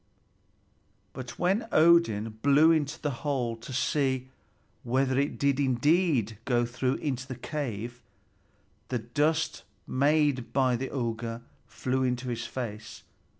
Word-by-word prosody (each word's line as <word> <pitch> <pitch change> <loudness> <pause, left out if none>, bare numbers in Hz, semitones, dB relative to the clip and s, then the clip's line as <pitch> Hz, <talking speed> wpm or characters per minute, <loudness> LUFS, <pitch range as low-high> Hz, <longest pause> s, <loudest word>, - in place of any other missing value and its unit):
But 120 -2 -8
when 195 +6 +1
Odin 115 -10 +4
blew 145 +3 +6
into 150 -3 0
the 145 - -1
hole 130 -6 -1
to 115 - -10
see 130 0 0 0.5
whether 130 +2 +1
it 140 +1 -1
did 140 -1 +1
indeed 135 - +2
go 120 -2 +2
through 125 +2 -1
into 130 -3 -3
the 130 - -5
cave, 120 -3 -5 0.9
the 125 - -1
dust 145 +7 0 0.2
made 145 -2 +1
by 130 -2 +3
the 130 +2 -3
auger 115 -2 -3 0.2
flew 130 +1 -2
into 125 0 -1
his 120 0 -3
face. 110 -4 -6
130 Hz, 125 wpm, -28 LUFS, 120-145 Hz, 0.9 s, blew